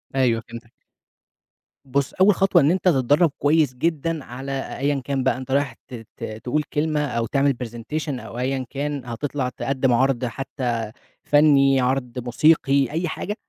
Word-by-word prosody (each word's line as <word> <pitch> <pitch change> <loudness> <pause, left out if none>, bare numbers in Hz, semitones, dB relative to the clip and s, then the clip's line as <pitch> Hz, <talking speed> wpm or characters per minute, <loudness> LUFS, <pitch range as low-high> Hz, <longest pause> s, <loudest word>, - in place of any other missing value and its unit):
أيوه 120 -4 +2
فهمتك. 115 0 -10 1.1
بُص، 135 +1 -1
أول 195 +2 +5
خطوة 195 -5 +4
إن 145 +4 +4
أنت 185 0 -1
تتدرّب 145 +2 +3
كويس 145 -2 +3
جدًا 160 +2 -1
على 135 +2 -5
أيًا 140 0 0
كان 135 -2 -1
بقى 130 - +1
أنت 130 0 -7
رايح 140 0 +1
ت - - -13 0.2
ت - - -9 0.2
تقول 150 +5 0
كلمة 150 0 0
أو 115 -2 -1
تِعمل 140 +4 +2
برزنتيشن 125 +4 -5
أو 120 - -9
أيًا 130 +1 -1
كان، 145 -1 -4
هتطلَع 125 +2 -3
تقدِّم 130 +1 0
عرْض 130 0 +2
حتى 120 -3 -3 0.3
فنّي، 140 -2 +4
عرْض 125 -1 -1
موسيقي، 140 +2 +2
أي 170 +3 -1
حاجة. 205 +6 -4
135 Hz, 155 wpm, -22 LUFS, 125-150 Hz, 1.1 s, أول